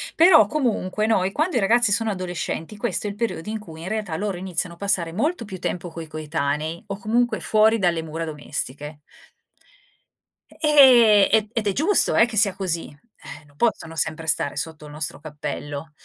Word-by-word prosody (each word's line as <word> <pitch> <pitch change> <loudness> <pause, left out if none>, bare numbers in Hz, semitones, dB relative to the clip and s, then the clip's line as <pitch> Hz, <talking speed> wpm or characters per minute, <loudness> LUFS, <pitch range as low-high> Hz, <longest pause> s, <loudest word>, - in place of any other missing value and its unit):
Però 330 0 +6
comunque 215 -8 -1
noi 195 -4 +1
quando 310 - -1
i - - +3
ragazzi 225 +2 +3
sono 225 +2 +1
adolescenti, 180 0 -5
questo 215 0 -2
è - - -2
il 200 - -7
periodo 215 -6 -4
in 220 0 -4
cui, 160 -6 -12
in 175 - -7
realtà, 210 -5 -3
loro 200 -2 -3
iniziano 180 -1 -3
a - - -26
passare 185 -4 0
molto 265 - -1
più 190 -3 -8
tempo 175 0 -4
coi 165 -1 -8
coetanei, 155 +1 -3
o 200 - -5
comunque 235 +4 0
fuori 220 +1 +3
dalle 170 -4 0
mura 160 +1 -5
domestiche 150 -1 -5 1.5
ehm, 250 - +6
e 220 -1 +2
ed 225 -3 -2
è 200 - +1
giusto, 325 - +4
eh, - - +6
che 225 -3 -6
sia 200 -2 +3
così, 175 -4 -3
ehm, 150 -2 -15
non 145 - -24
possono 165 -7 -1
sempre 160 +1 -2
stare 145 -2 +1
sotto 155 +1 -5
il 150 - -11
nostro 150 -1 -4
cappello, 145 0 -7
185 Hz, 185 wpm, -22 LUFS, 160-220 Hz, 1.5 s, Però